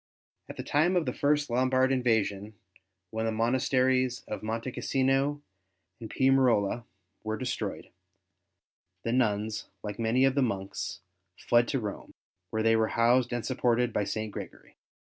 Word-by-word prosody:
At -, -, -8 dB
the -, -, -4 dB
time 165 Hz, +6 st, +2 dB
of 175 Hz, -3 st, +2 dB
the -, -, -2 dB
first 145 Hz, 0 st, +1 dB
Lombard 130 Hz, +2 st, +2 dB
invasion, 110 Hz, -5 st, 0 dB, 0.6 s
when 110 Hz, 0 st, -2 dB
the -, -, 0 dB
monasteries 130 Hz, +2 st, +1 dB
of 105 Hz, -, -5 dB
Monte 115 Hz, +3 st, -3 dB
Cassino 135 Hz, +3 st, 0 dB, 0.6 s
and 110 Hz, -, -8 dB
Piumarola 125 Hz, -5 st, +2 dB, 0.4 s
were 110 Hz, 0 st, -2 dB
destroyed, 125 Hz, 0 st, -4 dB, 1.1 s
the 115 Hz, -, -1 dB
nuns, 110 Hz, -3 st, 0 dB, 0.2 s
like 105 Hz, +1 st, -6 dB
many 115 Hz, +4 st, +3 dB
of 135 Hz, -, +3 dB
the 140 Hz, -, +1 dB
monks, 100 Hz, -6 st, -3 dB, 0.4 s
fled 120 Hz, 0 st, +3 dB
to 135 Hz, -, 0 dB
Rome, 105 Hz, -3 st, -6 dB, 0.3 s
where 110 Hz, 0 st, -1 dB
they 115 Hz, 0 st, +4 dB
were 110 Hz, 0 st, +2 dB
housed 120 Hz, +2 st, +3 dB
and 120 Hz, -1 st, -2 dB
supported 125 Hz, -2 st, +1 dB
by 105 Hz, -, +1 dB
St. 110 Hz, +1 st, -3 dB
Gregory. -, -, -9 dB
120 Hz, 145 wpm, -29 LUFS, 110-130 Hz, 1.1 s, they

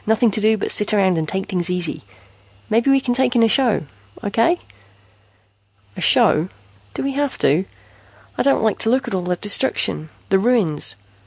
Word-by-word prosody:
Nothing 220 Hz, +1 st, +2 dB
to 215 Hz, -, -1 dB
do 220 Hz, +1 st, +2 dB
but -, -, -3 dB
sit 210 Hz, 0 st, +3 dB
around 190 Hz, -4 st, +1 dB
and 155 Hz, -, -4 dB
take 190 Hz, +3 st, -3 dB
things 180 Hz, -2 st, -1 dB
easy. 180 Hz, -3 st, -2 dB, 0.7 s
Maybe 230 Hz, +5 st, +1 dB
we 275 Hz, 0 st, +4 dB
can 250 Hz, -2 st, -2 dB
take 250 Hz, 0 st, 0 dB
in 235 Hz, -, +3 dB
a -, -, +4 dB
show. 235 Hz, -, +1 dB, 0.4 s
Okay?" 230 Hz, -, +1 dB, 1.4 s
"A -, -, -8 dB
show? 160 Hz, +4 st, +3 dB, 0.5 s
Do -, -, -4 dB
we 275 Hz, -, -2 dB
have 285 Hz, 0 st, -3 dB
to? 160 Hz, +7 st, +1 dB, 0.7 s
I -, -, -2 dB
don't 275 Hz, -4 st, +1 dB
like 220 Hz, -2 st, 0 dB
to 225 Hz, -, +3 dB
look 260 Hz, +2 st, 0 dB
at 240 Hz, -, -5 dB
all 185 Hz, -, -1 dB
the 180 Hz, 0 st, -2 dB
destruction, 200 Hz, -5 st, +1 dB, 0.2 s
the 195 Hz, -, +2 dB
ruins. 200 Hz, -9 st, +2 dB
215 Hz, 185 wpm, -19 LUFS, 185-245 Hz, 1.4 s, we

